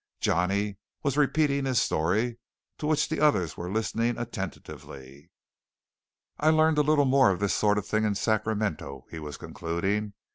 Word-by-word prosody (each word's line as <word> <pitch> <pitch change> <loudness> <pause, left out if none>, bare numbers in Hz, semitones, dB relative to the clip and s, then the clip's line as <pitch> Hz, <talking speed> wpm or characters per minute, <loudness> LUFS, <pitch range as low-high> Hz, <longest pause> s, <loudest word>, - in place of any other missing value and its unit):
Johnny 100 +4 0 0.3
was 140 -3 0
repeating 145 -1 +2
his 130 -4 +2
story, 110 +10 0 0.4
to 150 - -2
which 155 -1 +2
the 160 - -2
others 145 - +2
were 90 +1 -5
listening 115 +2 0
attentively. 75 - -8 1.1
"I 155 - +3
learned 155 -1 +4
a - - +6
little 150 -1 +3
more 135 -3 +5
of 95 - 0
this 100 -3 +1
sort 105 -1 +2
of 105 - -2
thing 110 0 0
in 105 -2 +1
Sacramento," 105 - -1
he 80 - -6
was 75 -3 -7
concluding. 95 +5 -2
110 Hz, 155 wpm, -27 LUFS, 90-140 Hz, 1.1 s, a